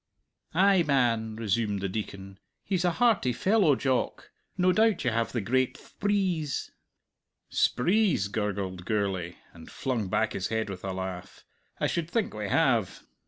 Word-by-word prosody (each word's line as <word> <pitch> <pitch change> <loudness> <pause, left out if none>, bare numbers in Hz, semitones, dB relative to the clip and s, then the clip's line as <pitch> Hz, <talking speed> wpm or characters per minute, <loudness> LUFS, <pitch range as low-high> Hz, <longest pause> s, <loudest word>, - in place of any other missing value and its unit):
"Ay 190 +1 +5
man," 120 -7 +1
resumed 105 -1 -1
the 100 - -2
Deacon; 95 -1 -6 0.2
"he's 185 -3 -1
a 175 -1 +2
hearty 225 - +3
fellow, 185 - +3
Jock. 130 -1 -1 0.3
No 185 0 +4
doubt 215 -5 +2
you 125 - +2
have 115 0 0
the 120 - -1
great 130 +4 0
thprees?" 190 -7 -1 0.8
"Sprees!" 180 - +2
gurgled 100 -3 -3
Gourlay, 95 -5 -1 0.2
and 80 -1 -13
flung 125 -7 -2
back 110 +3 +1
his 95 - -2
head 110 -2 -2
with 95 -2 -8
a 95 - -3
laugh. 95 -1 -6 0.3
"I - - +1
should 170 -1 -1
think 225 +2 -1
we 105 -2 -4
have. - - +1
115 Hz, 150 wpm, -28 LUFS, -, 0.8 s, Ay